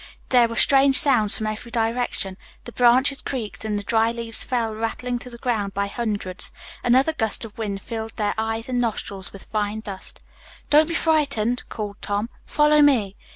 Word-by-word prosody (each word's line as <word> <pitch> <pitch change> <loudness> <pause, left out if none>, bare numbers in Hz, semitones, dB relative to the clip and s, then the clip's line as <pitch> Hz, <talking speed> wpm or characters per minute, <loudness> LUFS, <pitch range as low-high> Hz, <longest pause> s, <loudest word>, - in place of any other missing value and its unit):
There 245 -2 +5
were 230 - -6
strange 270 +3 +5
sounds 245 -8 +4
from 215 - -3
every 215 +2 -4
direction. 230 -4 -1 0.3
The 240 - -9
branches 255 +4 +4
creaked 230 -7 -5
and 215 -1 -1
the 205 - -4
dry 225 +2 +2
leaves 230 -1 -1
fell 235 -3 -1
rattling 235 +3 -3
to 250 - -9
the 235 - -10
ground 215 -5 -2
by 200 0 0
hundreds. 200 -4 -2 0.3
Another 260 +6 +3
gust 225 -5 0
of 220 - -12
wind 200 -3 -4
filled 225 -1 -6
their 210 -1 0
eyes 225 +1 -2
and 250 -1 0
nostrils 200 -4 -4
with 195 - -11
fine 215 0 -2
dust. 195 -3 -6 0.5
"Don't 305 +1 +6
be 335 - -3
frightened," 280 -8 +1
called 205 -2 -5
Tom. 205 +3 -2 0.2
"Follow 300 0 +4
me." 235 -9 +3
230 Hz, 180 wpm, -23 LUFS, 210-250 Hz, 0.5 s, Don't